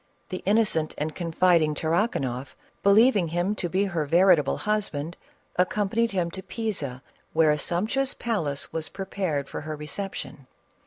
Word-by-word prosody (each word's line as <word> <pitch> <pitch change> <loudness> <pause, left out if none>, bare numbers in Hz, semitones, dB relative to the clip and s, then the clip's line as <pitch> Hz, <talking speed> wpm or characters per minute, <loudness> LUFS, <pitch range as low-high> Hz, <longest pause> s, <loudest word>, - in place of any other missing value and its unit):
The 185 - -4
innocent 205 -7 +2
and 155 +1 -2
confiding 165 -2 +2
Tarrakanoff, 155 - -1 0.3
believing 205 -2 +5
him 175 +5 0
to 180 -4 -3
be 190 +3 +1
her 170 -7 -1
veri 180 +4 +6
table 145 -2 -1
husband, 180 -7 -2 0.4
accompanied 210 +5 +1
him 180 -4 -1
to 190 - -7
Pisa, 190 - -4 0.3
where 160 -1 +5
a 150 - 0
sumptuous 220 - 0
palace 165 -12 -2
was 160 -1 -3
prepared 185 -7 -3
for - - -6
her 155 +1 -5
reception. 150 -3 -6
175 Hz, 145 wpm, -26 LUFS, 150-200 Hz, 0.4 s, veri